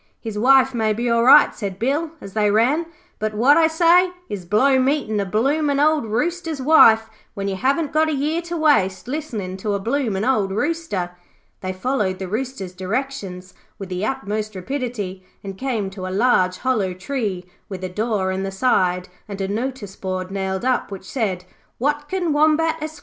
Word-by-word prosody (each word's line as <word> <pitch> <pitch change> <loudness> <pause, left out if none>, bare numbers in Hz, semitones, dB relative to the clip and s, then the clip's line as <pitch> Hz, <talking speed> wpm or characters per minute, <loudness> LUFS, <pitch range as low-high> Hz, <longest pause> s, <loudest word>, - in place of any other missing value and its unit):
'His 220 -3 -6
wife 265 +4 +4
may 220 -2 +1
be 235 +3 -2
all 235 0 +3
right,' 275 +4 +7
said 195 -3 -5
Bill 285 +9 0
as 195 - -10
they 210 -1 +2
ran, 255 +11 +2 0.3
'but 215 0 -2
what 255 +7 +5
I 325 -1 +5
say 340 +3 +4 0.2
is, 195 -4 -5
blow 260 +8 +3
meetin' 260 -5 0
a 200 - 0
bloomin' 280 +8 +1
old 300 -4 +2
Rooster's 325 +7 -2
wife 230 -6 +6 0.3
when 200 -1 -3
you 195 - -2
haven't 280 - 0
got 315 +1 +3
a - - 0
year 305 +4 -1
to 345 0 -5
waste 235 - +2
listenin' 230 -10 -4
to 205 +1 -2
a - - -1
bloomin' 225 -2 -1
old 220 -7 +1
Rooster.' 205 - -2 0.5
They 185 - -4
followed 190 -1 -1
the 190 - -5
Rooster's 215 -3 -4
directions 190 -2 -4 0.2
with 195 -2 -8
the 180 +1 -3
utmost 215 -3 -3
rapidity, 205 -4 -4 0.2
and 195 -1 -6
came 220 -5 -2
to 190 -1 -6
a 185 +1 -3
large 185 -6 +3
hollow 210 -8 0
tree 195 -3 -3 0.2
with 190 -2 -7
a - - -1
door 210 -1 -1
in 190 0 -2
the 195 - -2
side 185 -4 +1 0.2
and 200 -1 -7
a 195 - -1
notice 220 -1 -4
board 185 -1 -4
nailed 190 +2 -3
up 255 -1 +1
which 195 -1 -8
said, 195 -7 -2 0.3
'Watkin 295 +5 -1
Wombat, 315 +2 +3
Esq. 310 0 -6
225 Hz, 180 wpm, -21 LUFS, 195-280 Hz, 0.5 s, right